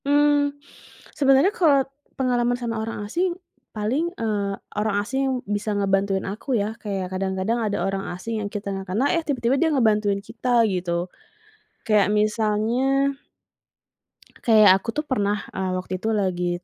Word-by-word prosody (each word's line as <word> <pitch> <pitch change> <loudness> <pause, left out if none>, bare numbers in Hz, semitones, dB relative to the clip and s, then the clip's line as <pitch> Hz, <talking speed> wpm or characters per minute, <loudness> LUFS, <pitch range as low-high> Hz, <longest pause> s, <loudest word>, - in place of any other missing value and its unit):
Mmm, 290 0 +3 0.6
sebenarnya 275 +7 +4
kalau 285 -6 +4 0.3
pengalaman 245 -2 +1
sama 230 -2 -3
orang 220 -2 -4
asing 350 - -1 0.3
paling, 245 +11 -1
eee, 205 -3 -1 0.2
orang 210 -1 0
asing 265 +1 -1
bisa 205 +1 -2
ngebantuin 195 -1 +1
aku 230 +6 -2
ya 210 +1 -1
kayak 195 -3 -3
kadang-kadang 190 +4 -1
ada 205 -5 -1
orang 195 0 -2
asing 215 +5 -4
yang 205 - -3
kita 205 -1 -5
gak 195 -1 -6
kenal 235 +9 +2
eh 335 - +1
tiba-tiba 265 -4 0
dia 330 - +4
ngebantuin 210 -7 +2
kita 235 +3 +1
gitu 175 -2 -1 0.8
kayak 210 -2 +3
misalnya 225 +6 +1 1.3
kayak 215 -4 +7
aku - - -7
tuh 300 - -1
pernah, 210 -7 0 0.2
eee, 190 0 -2
waktu 185 0 -5
itu 220 - -1
lagi 185 -4 0
215 Hz, 145 wpm, -23 LUFS, 200-265 Hz, 1.3 s, kayak